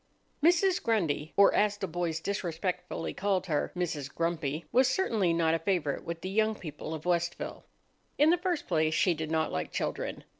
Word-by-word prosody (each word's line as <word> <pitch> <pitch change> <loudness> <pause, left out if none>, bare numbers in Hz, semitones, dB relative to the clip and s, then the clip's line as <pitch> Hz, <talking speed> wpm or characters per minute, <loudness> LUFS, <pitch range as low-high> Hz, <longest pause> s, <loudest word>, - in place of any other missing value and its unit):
* - - -32
Mrs. 355 +3 +4
Grundy 165 -9 0
(or, 200 - +7
as 205 -1 +2
the 200 - -2
boys 165 -1 -2
disrespectfully 180 -1 -3
called 190 -2 0
her, 155 -5 -1
Mrs. 160 -6 -3
Grumpy) 165 -2 -2
was 255 +2 +5
certainly 230 - +1
not 165 -1 +2
a 165 - +1
favourite 165 -5 -1
with 170 0 -5
the 185 - -4
young 220 +1 +2
people 155 -3 -6
of 155 - -9
Westville. 175 -1 -1 0.5
In 300 +3 +5
the 350 - +4
first 355 -3 -1
place, 155 -2 +1
she 180 - +3
did 160 -1 -4
not 160 -1 0
like 80 - -3
children. - - -3
175 Hz, 185 wpm, -30 LUFS, 160-205 Hz, 0.5 s, or